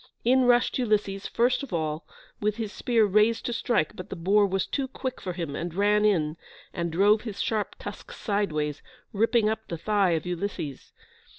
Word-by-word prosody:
In 255 +1 +4
rushed 245 +1 +3
Ulysses 205 -4 0
first 245 +4 +2
of 280 - -7
all, 155 -2 -2 0.3
with 210 0 0
his 220 -2 -4
spear 230 -3 +2
raised 215 +3 +3
to 240 - -1
strike, 230 -9 0
but 185 - -8
the - - -5
boar 200 +4 +3
was 195 0 0
too 275 -2 -2
quick 260 -1 -5
for 180 - -4
him, 165 -5 -4
and 170 +1 -4
ran 210 +2 +3
in, 165 -6 +2 0.4
and 170 -1 -2
drove 205 +5 +4
his 215 -4 -7
sharp 215 -2 -1
tusk - - -8
sideways, 155 -9 -2 0.3
ripping 225 +1 +3
up 220 0 -2
the 170 - -4
thigh 200 0 +2
of 160 0 -1
Ulysses. 175 -6 -4
205 Hz, 185 wpm, -27 LUFS, 170-225 Hz, 0.4 s, In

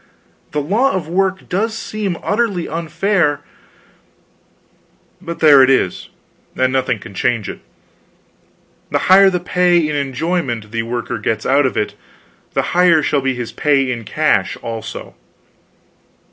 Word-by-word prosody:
The 150 -1 -2
law 225 - +1
of 180 -5 -3
work 190 +2 -1
does 220 +5 -1
seem 205 -5 -4
utterly 205 -5 0
unfair 165 -1 0 1.8
but 170 0 -7
there 145 -4 +8
it 130 - +5
is, 130 -9 0 0.5
and 130 0 +1
nothing 130 -3 0
can 100 - -12
change 115 +1 -1
it: - - -7 1.3
the - - +1 0.2
higher 195 0 +7
the 180 -1 -1
pay 180 0 +2
in 150 - -2
enjoyment 135 -5 -2
the 115 0 -1
worker 120 +1 -4
gets 110 -1 -2
out 140 +1 +3
of - - -5
it, 105 - -1 0.6
the - - +1
higher 175 -3 +4
shall 145 -1 +1
be 135 -1 -1
his 120 -2 -5
pay 135 -3 +1
in 120 -2 -4
cash, - - 0
also. 115 -2 -6
150 Hz, 140 wpm, -17 LUFS, 125-180 Hz, 1.8 s, there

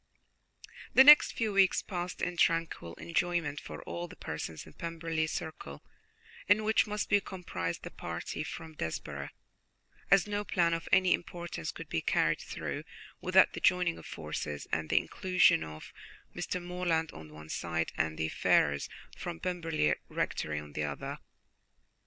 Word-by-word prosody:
The 265 - +10
next 295 +2 +9
few 220 -4 -1
weeks 195 -1 +4
passed 180 -2 -4
in 180 - -1
tranquil 165 - +1
enjoyment 170 -3 -1
for - - -9
all 175 0 -5
the 180 - -12
persons 80 - -6
in - - -13
the - - -26
Pemberley 165 -1 -2
circle, 115 - -6 0.6
in 205 +2 +5
which 220 +1 +3
must 210 0 -2
be 205 -1 +4
comprised 130 - -4
the - - -7
party - - -5
from 160 -1 -7
Desborough, 75 - -4 0.8
as 195 -1 +6
no 205 0 -2
plan 170 -4 +2
of 165 0 -3
any 185 -1 +5
importance 175 - -4
could - - -9
be - - -1
carried - - +2
through - - -5 0.4
without - - +5
the - - -5
joining 180 -2 +3
of - - -11
forces, 75 -2 -5
and 80 0 -1
the - - +3
inclusion 185 - +3
of 75 0 -9 0.4
Mr. 180 - -2
Morland 175 -2 -1
on 80 0 -10
the 75 - -14
one 75 0 -11
side 85 0 -2
and 80 -1 -1
the 80 0 -1
Ferrars 70 -2 +2 0.3
from 80 - -6
Pemberley 165 - 0 0.2
Rectory 75 -1 -2
on 75 0 -10
the 75 - -2
other. 70 -1 -4
165 Hz, 160 wpm, -31 LUFS, -, 0.8 s, The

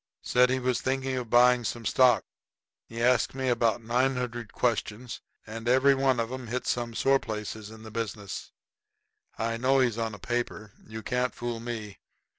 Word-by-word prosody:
"Said 125 0 +4
he 130 - +1
was 125 -1 0
thinking 130 0 -1
of 125 -3 -4
buying 125 +1 +5
some 115 +1 -4
stock. 125 +4 +4 0.6
He 115 +1 -4
asked 125 +1 +3
me 130 -1 -1
about 115 -1 +1
nine 125 +4 +1
hundred 120 -3 -4
questions, 120 0 -2 0.2
and 115 +2 -5
every 130 +2 +5
one 135 -2 +2
of 115 +1 -1
'em 130 -2 -6
hit 125 +3 -3
some 120 -1 -2
sore 135 +2 +3
place 105 -3 -5
in 110 0 -10
the 110 - -10
business. 105 -3 -5 0.9
I 115 0 -1
know 130 +3 +3
he's 120 -4 +2
on 115 -2 -2
a - - -10
paper. 115 -1 -3 0.2
You 110 0 -7
can't 125 0 -1
fool 120 -1 -4
me. 115 -4 -6
120 Hz, 180 wpm, -28 LUFS, 115-125 Hz, 0.9 s, buying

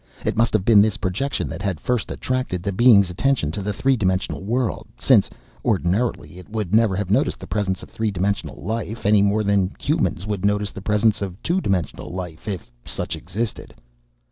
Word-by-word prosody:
It - - 0
must 115 +1 +2
have 105 -3 +1
been 105 -3 +7
this 110 0 +2
projection 105 +9 -2
that - - -6
had 95 -5 -2
first 125 +7 -1
attracted 130 -9 -2
the 100 - -1
Being's 100 -3 +5
attention 120 - +1
to 100 - -4
the 105 +2 -2
three 135 +6 +2
dimensional 95 -4 -1
world, 120 +3 -1
since, - - +4 0.3
ordinarily, 95 -5 0
It 90 - -13
would 105 -4 -3
never 110 -3 +4
have 100 -1 -2
noticed 105 - +2
the - - -8
presence 95 -3 -2
of - - -11
three 110 -1 -1
dimensional 100 +1 -2
life, 110 +2 -4
any 105 0 +5
more 100 +2 +2
than 100 -2 +1
humans 140 - 0
would 105 -3 -3
notice 105 0 +1
the 95 - -8
presence 105 +1 +2
of 95 -1 -4
two 185 +3 +1
dimensional 95 - -2
life 90 -2 -7
if 90 - -5
such - - -4
existed! 105 +6 -5
100 Hz, 195 wpm, -22 LUFS, 95-110 Hz, 0.3 s, been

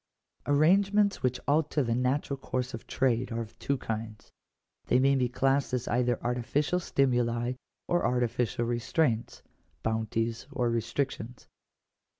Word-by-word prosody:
§1. 145 - +2
Arrangements 200 +6 +3
which 125 0 0
alter 150 0 +2
the 115 -2 0
natural 130 +3 0
course 130 -1 -3
of 115 - -8
trade 125 -1 +1
are 115 - -2
of 110 -1 -10
two 140 - 0
kinds; 110 -2 -6 0.6
they - - +4
may 135 +2 +4
be 130 -2 +1
classed 135 +1 +1
as 125 0 -3
either 120 -1 +1
artificial 130 +8 0
stimuli 120 -6 +1 0.3
or 175 - +1
artificial 120 -1 0
restraints 120 +1 0 0.2
— - - -40
bounties 115 +2 -1
or 125 -4 0
restrictions. 115 0 -3
125 Hz, 140 wpm, -29 LUFS, 115-140 Hz, 0.6 s, they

